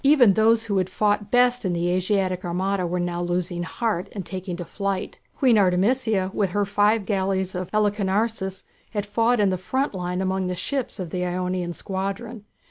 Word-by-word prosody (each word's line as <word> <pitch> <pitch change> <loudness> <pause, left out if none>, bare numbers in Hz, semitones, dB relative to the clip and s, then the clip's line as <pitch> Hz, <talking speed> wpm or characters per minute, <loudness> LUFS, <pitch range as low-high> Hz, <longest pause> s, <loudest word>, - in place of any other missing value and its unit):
Even 270 -7 +6
those 225 +2 +4
who 200 -4 0
had 185 0 -1
fought 205 +1 0
best 245 +1 +3
in 185 -3 0
the 170 0 0
Asiatic 185 0 0
armada 185 +1 -1
were 180 +1 -1
now 175 0 -2
losing 175 0 -2
heart 195 +1 -2
and 195 -4 -5
taking 185 -1 -5
to 175 - -5
flight. 195 0 -3 0.2
Queen 245 -5 +4
Artemisia, 195 +1 +2
with 200 -3 +1
her 205 +3 0
five 205 +1 +2
galleys 190 -2 0
of 180 -1 -4
Halicarnassus, 205 -1 0 0.3
had 205 -2 -1
fought 230 +3 +2
in 200 -2 +3
the 185 - -1
front 260 +9 -1
line 180 -1 -3
among 190 0 0
the 180 - -2
ships 265 +7 -3
of 175 -4 -5
the 180 -1 -2
Ionian 180 0 -2
squadron. 200 +5 -4
195 Hz, 185 wpm, -24 LUFS, 180-215 Hz, 0.3 s, Even